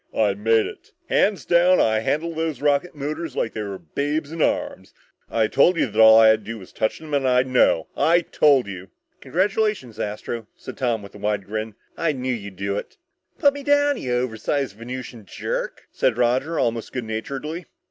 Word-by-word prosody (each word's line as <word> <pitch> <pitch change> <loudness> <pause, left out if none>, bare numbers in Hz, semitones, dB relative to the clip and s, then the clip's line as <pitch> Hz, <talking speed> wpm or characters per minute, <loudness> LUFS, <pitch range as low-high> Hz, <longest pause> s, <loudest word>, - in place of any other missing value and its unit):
"I 105 -3 +3
made 110 +2 +2
it - - -10 0.2
hands 205 -1 +2
down 175 +1 +4
I 110 -1 +3
handled 160 +8 -1
those 160 -4 -2
rocket 145 +4 +1
motors 150 +1 -4
like 115 - -1
they 110 - -4
were 100 -2 -5
babes 145 - -3
in 165 -1 -4
arms! - - -1 0.3
I 115 -1 +2
told 165 +10 +3
you - - +3
that 110 -2 +1
all 110 0 +9
I 110 -1 +7
had 110 0 +4
to 105 - -6
do 115 - -6
was 95 -4 -13
touch 110 - -1
them 155 -2 -10
and 140 -2 +1
I'd 125 0 +3
know! 125 -10 +3
I 170 +2 +3
told 145 -5 +3
you!" 95 -1 -8 0.3
"Congratulations, 190 - -1
Astro," 105 +1 -4
said - - -9
Tom 120 -5 0
with 100 - -12
a 105 - -12
wide 105 -1 -1
grin. 110 +1 -4 0.2
"I 165 -2 +1
knew 130 -1 -2
you'd 100 -4 -7
do 100 +2 -2
it." - - -11 0.4
"Put 285 -3 +4
me 285 - -7
down, 285 0 +3
you 125 - -4
oversized 125 0 -1
Venusian 120 0 -8
jerk," - - -4
said 120 -3 +1
Roger, 130 +7 +1
almost 115 -1 -1
good 125 - -3
naturedly. 140 +10 -5
125 Hz, 200 wpm, -23 LUFS, 110-155 Hz, 0.4 s, all